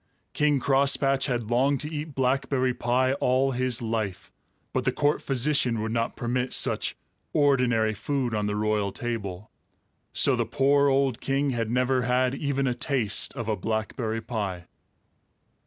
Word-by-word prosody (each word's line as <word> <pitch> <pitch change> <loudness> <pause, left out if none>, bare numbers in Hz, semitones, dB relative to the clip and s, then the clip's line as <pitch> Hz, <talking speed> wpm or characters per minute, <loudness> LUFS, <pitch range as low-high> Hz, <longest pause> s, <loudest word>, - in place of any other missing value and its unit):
King 150 -2 +2
Crosspatch 135 0 +2
had 120 -4 -2
longed 135 +3 +2
to 150 +2 -5
eat 150 -1 -5
blackberry 130 0 +1
pie 125 +2 +1
all 130 +2 +2
his 125 -1 0
life, 110 -4 -3 0.4
but - - 0
the - - +1
court 145 +1 +1
physician 130 -3 +1
would 110 +1 -2
not 115 0 -1
permit 125 +1 -2
such - - 0 0.4
ordinary 125 -7 +3
food 125 +3 -2
on 105 -1 0
the 105 - -1
royal 105 -1 0
table. 105 -4 -5 0.6
So - - +3
the - - +1
poor 140 +1 +3
old 135 -3 +1
king 140 +1 0
had 115 -3 -2
never 125 +2 +1
had 125 +1 +1
even 140 -1 -1
a 125 - +1
taste 120 -3 -1
of 115 -5 -5
a 110 - +1
blackberry 110 +2 -2
pie. 100 -7 -4
125 Hz, 155 wpm, -26 LUFS, 110-135 Hz, 0.6 s, ordinary